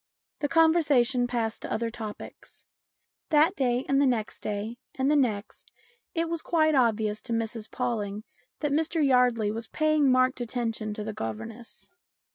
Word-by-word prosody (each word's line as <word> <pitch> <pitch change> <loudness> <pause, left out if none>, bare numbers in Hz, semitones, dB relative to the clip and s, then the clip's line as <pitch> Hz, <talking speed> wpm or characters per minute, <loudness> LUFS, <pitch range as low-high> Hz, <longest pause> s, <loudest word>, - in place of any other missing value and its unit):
The 290 - 0
conversation 290 -6 +3
passed 230 -2 -2
to - - -6
other 230 0 -1
topics. 215 -2 -9 0.6
That 320 +4 +4
day, 250 -3 0
and 275 0 +3
the 280 - +4
next 230 -4 -1
day, 215 +3 -4 0.2
and 265 +2 +1
the - - +4
next, 220 -7 -1 0.4
it 330 0 0
was 335 -1 -2
quite 315 -2 +2
obvious 220 -5 +1
to 235 - -4
Mrs 225 -1 -3
Pawling 215 -4 -3 0.4
that 295 -2 0
Mr 315 +1 +1
Yardley 250 -5 +3
was 225 +1 -4
paying 310 -3 +2
marked 255 0 +2
attention 225 -3 -3
to 210 - -5
the 215 0 -5
governess. 220 - -7
245 Hz, 155 wpm, -27 LUFS, 220-290 Hz, 0.6 s, That